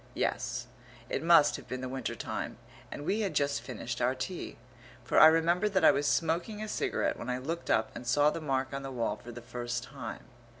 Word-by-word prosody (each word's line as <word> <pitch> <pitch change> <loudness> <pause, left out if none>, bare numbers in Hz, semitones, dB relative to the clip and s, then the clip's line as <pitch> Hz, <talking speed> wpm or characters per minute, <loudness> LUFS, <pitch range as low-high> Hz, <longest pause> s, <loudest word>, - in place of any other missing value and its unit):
Yes, - - -1 0.5
it - - 0
must 160 -3 +6
have - - -12
been 130 0 -4
the 130 - -3
winter 130 -1 -3
time, - - -4 0.3
and 145 - -6
we 205 +6 +1
had 195 -7 -1
just 140 -1 +1
finished 120 -1 -5
our 125 +2 +2
tea, 175 +8 -5 0.5
for 120 - +3
I 155 - +11
remember 170 +5 +3
that 190 -4 +2
I - - +9
was 145 +1 0
smoking 165 - 0
a - - -4
cigarette - - -1
when 120 - -5
I 125 - 0
looked 165 +7 -4
up 110 0 +2
and 120 - -7
saw 145 +4 +4
the 165 - -5
mark 135 -2 -1
on 135 - -3
the 135 - -5
wall 120 -3 -1
for 120 - -10
the 120 0 -9
first 120 0 -4
time. - - -7
140 Hz, 220 wpm, -30 LUFS, 125-165 Hz, 0.5 s, I